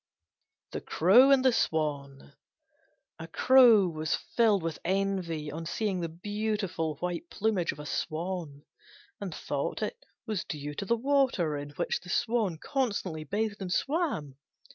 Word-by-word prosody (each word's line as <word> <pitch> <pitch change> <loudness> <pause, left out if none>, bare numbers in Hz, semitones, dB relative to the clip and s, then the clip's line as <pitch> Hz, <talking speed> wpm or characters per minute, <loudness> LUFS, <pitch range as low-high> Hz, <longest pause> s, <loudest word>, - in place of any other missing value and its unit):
THE - - -4
CROW 225 - +5
AND 270 -1 +5
THE 260 - +5
SWAN 140 - -2 0.9
A 165 - -7
Crow 235 +1 +6
was 155 -2 -1
filled 215 -6 +1
with 165 -2 -3
envy 180 -5 -1
on 165 +2 -6
seeing 200 -1 -1
the 170 -1 -3
beautiful 195 -3 -2
white 180 - -3
plumage 205 -5 0
of - - -11
a 150 - -8
Swan, 160 -1 -4 0.6
and - - -5
thought - - -3
it - - -5 0.2
was 215 -5 -2
due 150 -1 -6
to 170 - -5
the 235 +4 +1
water 255 - +1
in 145 0 -5
which - - -1
the 180 - -13
Swan 215 -4 0
constantly 205 - -2
bathed 210 +4 -2
and 185 -2 -4
swam. 230 - -1
185 Hz, 145 wpm, -29 LUFS, 160-220 Hz, 0.9 s, Crow